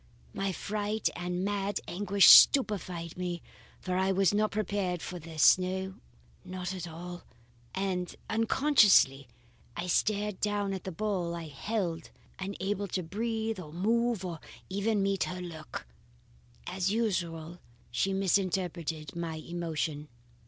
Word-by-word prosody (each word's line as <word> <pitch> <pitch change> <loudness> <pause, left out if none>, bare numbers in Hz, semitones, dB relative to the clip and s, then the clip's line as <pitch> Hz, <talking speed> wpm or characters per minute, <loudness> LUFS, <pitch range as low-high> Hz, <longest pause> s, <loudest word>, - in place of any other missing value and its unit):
My 195 -1 -1
fright 210 +3 -1
and 180 +1 -2
mad 205 0 -1
anguish 200 +1 +3
stupefied 185 - +6
me; 175 -1 -3 0.4
for 185 -1 -3
I 190 +1 +2
was 195 -1 +3
not 215 +1 +2
prepared 200 -4 -1
for 180 +2 -6
this, 160 +2 +5
no, 190 +1 -3 0.5
not 185 0 -5
at 180 -2 -5
all; 175 +2 -8 0.5
and 185 -2 -2
unconsciously 220 - +4 0.5
I 170 - -2
stared 205 +2 0
down 205 -1 0
at 190 - -6
the 190 - -3
bowl 185 -3 -2
I 165 -2 -6
held, 170 +1 -3 0.3
unable 200 +1 -3
to 185 -1 -2
breathe 220 +3 -2
or 155 -4 -8
move 225 +3 +1
or 170 -3 -5 0.3
even 205 +3 0
to 200 - +2
meet 195 -1 +1
her 180 0 -5
look." 170 - -7 0.8
As 185 +1 -1
usual 175 -7 -2 0.3
she 190 +11 +1
misinterpreted 180 -5 -1
my 170 -2 -3
emotion. 160 -2 -3
185 Hz, 130 wpm, -30 LUFS, 170-205 Hz, 0.8 s, stupefied